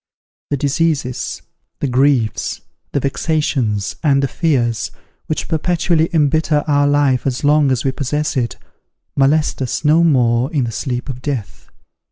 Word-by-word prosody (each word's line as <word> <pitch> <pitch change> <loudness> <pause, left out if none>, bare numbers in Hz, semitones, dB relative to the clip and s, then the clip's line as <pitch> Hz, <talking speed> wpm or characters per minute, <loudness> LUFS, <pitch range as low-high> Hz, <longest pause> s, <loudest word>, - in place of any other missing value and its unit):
The 145 - 0
diseases, 140 -3 -1 0.4
the 145 - -1
griefs, 130 -3 +1 0.3
the - - 0
vexations, 135 - -1
and 140 -3 +3
the - - +2
fears, 120 -8 0 0.4
which 155 - -2
perpetually 165 0 +1
embitter 155 -1 +2
our 145 -1 +3
life 145 -3 +2
as 130 +1 -2
long 145 0 +4
as 130 0 0
we 135 - +2
possess 150 +3 -2
it, 120 -3 -1 0.6
molest 145 +2 +2
us 130 +4 -2
no 160 +3 +5
more 125 -4 +2
in 145 -6 +1
the 115 - -2
sleep 125 +2 -3
of 125 -2 -6
death. 130 -7 -5
140 Hz, 145 wpm, -18 LUFS, 125-150 Hz, 0.6 s, no